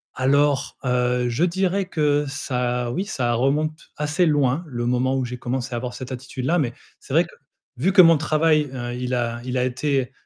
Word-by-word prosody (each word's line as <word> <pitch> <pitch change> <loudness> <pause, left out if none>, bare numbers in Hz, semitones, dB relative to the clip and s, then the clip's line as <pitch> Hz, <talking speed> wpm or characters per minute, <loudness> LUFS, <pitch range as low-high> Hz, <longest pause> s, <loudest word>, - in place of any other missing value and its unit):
Alors, 140 +1 +2
heu, 125 0 +1
je 120 +7 0
dirais 190 +2 +1
que 150 -4 +1
ça 125 -3 -2
oui, 185 - -1
ça 125 - -1
remonte 150 +6 -1
assez 150 +4 +1
loin 145 0 +2
le 120 -4 -4
moment 125 +2 +1
où 130 - -1
j'ai 125 +1 -6
commencé 125 +1 -3
à - - -1
avoir 125 +1 -5
cette 130 0 -7
attitude 130 0 -6
là, 175 +5 +2
mais 125 -6 -1 0.3
c'est - - -9
vrai - - +6
que, - - -16 0.4
vu 165 +10 +2
que 185 - +9
mon 165 -1 +6
travail, 155 -1 +2
heu, 120 -1 -4
il 125 +1 -2
a 120 -1 -2
il 130 0 -3
a 125 - +2
été, 130 0 -1
130 Hz, 205 wpm, -23 LUFS, 125-150 Hz, 0.4 s, que